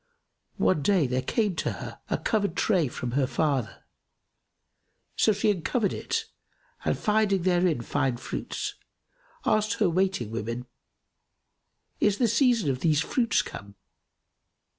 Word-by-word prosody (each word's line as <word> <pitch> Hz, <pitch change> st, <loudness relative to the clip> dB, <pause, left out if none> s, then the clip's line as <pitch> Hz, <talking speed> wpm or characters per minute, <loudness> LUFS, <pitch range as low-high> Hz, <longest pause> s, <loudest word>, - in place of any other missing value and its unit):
One 170 Hz, -6 st, +2 dB
day, 185 Hz, -1 st, +3 dB
there 130 Hz, 0 st, 0 dB
came 205 Hz, -, 0 dB
to -, -, -1 dB
her -, -, -8 dB
a -, -, +1 dB
covered 200 Hz, -5 st, 0 dB
tray 185 Hz, -8 st, +2 dB
from 120 Hz, 0 st, -5 dB
her 135 Hz, +1 st, +1 dB
father; 135 Hz, -8 st, -1 dB, 1.3 s
so 220 Hz, -, +4 dB
she 210 Hz, +1 st, +2 dB
uncovered 200 Hz, +3 st, 0 dB
it 455 Hz, -1 st, -2 dB, 0.6 s
and -, -, 0 dB
finding 210 Hz, -3 st, +2 dB
therein 175 Hz, -6 st, +2 dB
fine 135 Hz, 0 st, 0 dB
fruits, -, -, -4 dB, 0.7 s
asked 215 Hz, 0 st, +2 dB
her 200 Hz, -5 st, +1 dB
waiting 185 Hz, -, 0 dB
women, 115 Hz, +2 st, -4 dB, 1.3 s
"Is 205 Hz, -1 st, +3 dB
the 245 Hz, -, +3 dB
season 230 Hz, -, +3 dB
of 130 Hz, -, -3 dB
these 155 Hz, 0 st, +2 dB
fruits 235 Hz, +6 st, +1 dB
come?" 100 Hz, 0 st, -9 dB
180 Hz, 130 wpm, -27 LUFS, 130-210 Hz, 1.3 s, so